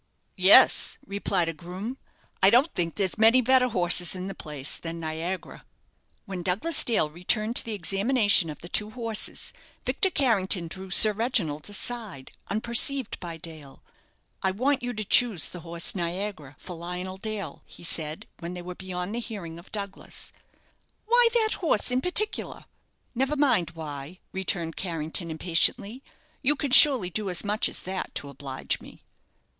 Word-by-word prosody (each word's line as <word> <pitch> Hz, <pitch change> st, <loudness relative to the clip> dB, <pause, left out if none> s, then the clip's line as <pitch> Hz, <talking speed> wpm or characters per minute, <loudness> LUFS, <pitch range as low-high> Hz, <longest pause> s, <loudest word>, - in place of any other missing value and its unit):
"Yes," -, -, +6 dB
replied 195 Hz, -4 st, -1 dB
a 165 Hz, -, -3 dB
groom; 185 Hz, -, -8 dB, 0.4 s
"I 190 Hz, -, +7 dB
don't 255 Hz, +9 st, +3 dB
think 170 Hz, -2 st, -2 dB
there's 195 Hz, 0 st, -2 dB
many 225 Hz, +3 st, +6 dB
better 255 Hz, +1 st, +3 dB
horses 180 Hz, -4 st, +1 dB
in 185 Hz, 0 st, -6 dB
the 195 Hz, -, -5 dB
place 150 Hz, -5 st, -4 dB
than 165 Hz, 0 st, -7 dB
'Niagara.'" 165 Hz, +3 st, -6 dB, 0.6 s
When 190 Hz, -2 st, -6 dB
Douglas 200 Hz, -, +1 dB
Dale 225 Hz, -10 st, +1 dB
returned 215 Hz, +8 st, -1 dB
to -, -, +5 dB
the 225 Hz, -2 st, -4 dB
examination 205 Hz, 0 st, +2 dB
of 150 Hz, -, -9 dB
the 175 Hz, -, -10 dB
two 210 Hz, +4 st, +1 dB
horses, 225 Hz, -1 st, -3 dB, 0.3 s
Victor 385 Hz, -, +1 dB
Carrington 200 Hz, -, +1 dB
drew 190 Hz, +3 st, -7 dB
Sir 215 Hz, +4 st, +8 dB
Reginald 200 Hz, -, -1 dB
aside, 205 Hz, -, -2 dB, 0.2 s
unperceived 235 Hz, +4 st, 0 dB
by 170 Hz, -2 st, -7 dB
Dale. 155 Hz, -4 st, -12 dB, 0.6 s
"I 190 Hz, -, +2 dB
want 260 Hz, +8 st, 0 dB
you 245 Hz, 0 st, -3 dB
to 215 Hz, -1 st, -4 dB
choose 200 Hz, -9 st, +3 dB
the 180 Hz, -, -8 dB
horse 170 Hz, 0 st, -1 dB
'Niagara' 175 Hz, -5 st, -5 dB
for 180 Hz, -, -9 dB
Lionel 180 Hz, +2 st, -6 dB
Dale," 210 Hz, -2 st, -6 dB
he -, -, -13 dB
said, 160 Hz, -2 st, -1 dB
when 170 Hz, +2 st, -7 dB
they 175 Hz, -, -8 dB
were 180 Hz, +1 st, -7 dB
beyond 180 Hz, +1 st, -6 dB
the 235 Hz, -, -3 dB
hearing 190 Hz, -9 st, -8 dB
of 170 Hz, -, -17 dB
Douglas. 200 Hz, -2 st, -4 dB, 0.7 s
"Why 480 Hz, +2 st, +5 dB
that 440 Hz, -2 st, +2 dB
horse 325 Hz, -7 st, +1 dB
in 250 Hz, +1 st, 0 dB
particular?" 420 Hz, +6 st, +1 dB, 0.5 s
"Never 265 Hz, +4 st, -1 dB
mind 220 Hz, -, +2 dB
why," 150 Hz, +1 st, -8 dB
returned 175 Hz, -4 st, -2 dB
Carrington, 165 Hz, -1 st, -2 dB
impatiently. 180 Hz, +8 st, +1 dB, 0.4 s
"You 290 Hz, +2 st, +2 dB
can 280 Hz, -1 st, -4 dB
surely 255 Hz, -9 st, +8 dB
do 210 Hz, +1 st, -2 dB
as 180 Hz, -, +1 dB
much 210 Hz, +1 st, 0 dB
as -, -, -6 dB
that 190 Hz, +1 st, -5 dB
to 140 Hz, -, -4 dB
oblige 135 Hz, -1 st, -4 dB
me." -, -, -15 dB
190 Hz, 160 wpm, -26 LUFS, 170-230 Hz, 0.7 s, Sir